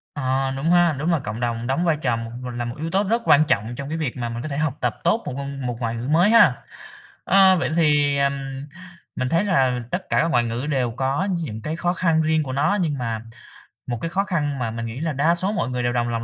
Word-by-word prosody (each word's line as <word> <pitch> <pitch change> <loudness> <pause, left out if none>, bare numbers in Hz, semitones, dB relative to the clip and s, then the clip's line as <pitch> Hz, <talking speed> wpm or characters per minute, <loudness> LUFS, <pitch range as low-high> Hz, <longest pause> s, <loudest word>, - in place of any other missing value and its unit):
Ờ, 135 -1 0
đúng 145 +5 -1
ha. 175 -3 +4
Đúng 160 +5 0
là 165 - +2
cộng 110 -3 -6
đồng 120 -1 -2
đóng 135 +7 0
vai 165 -3 +2
trò 125 -5 +1
một 115 0 -6 0.3
là 120 - -2
một 120 0 -5
yếu 160 +2 -3
tố 195 +4 +1
rất 230 +4 0
quan 150 +2 +5
trọng 110 -1 0
trong 140 +2 -6
cái 160 - -3
việc 150 -7 -3
mà 120 -1 -3
mình 115 0 -5
có - - -4
thể 140 - -4
học 150 -2 -1
tập - - -1
tốt 195 +7 +2
một - - -4
ngôn 140 -1 -5
một 120 -1 -3
ngoại 115 -2 -2
ngữ 115 +2 -5
mới 170 +7 +4
ha. 230 +1 +5 0.6
Ơ, 190 -1 +5
vậy 165 - -1
thì, 145 -3 +3
ừm, 140 0 +2 0.8
mình 130 0 -2
thấy 170 +6 +2
là 135 -11 +2
tất 185 +1 -4
cả - - +2
các - - +1
ngoại 120 -7 +2
ngữ 120 +3 -3
đều 130 -5 0
có 135 - -1
những 110 -10 -5 0.2
khó 175 +1 0
khăn 165 -3 +2
riêng 160 0 +1
của 130 -2 -5
nó, 150 +9 +1
nhưng 155 -5 -1
mà 115 -3 -3 0.7
một 120 - -2
cái 165 - -2
khó 190 +4 0
khăn 145 -8 -2
mà 115 -2 -2
mình 115 +1 -5
nghĩ 115 +3 -6
là 160 0 -2
đa 155 +5 +2
số 185 +3 +3
mọi 130 - -1
người 125 -1 -2
đều 120 0 0
đồng 120 -1 0
lòng 115 -1 -2
140 Hz, 265 wpm, -22 LUFS, 120-165 Hz, 0.8 s, quan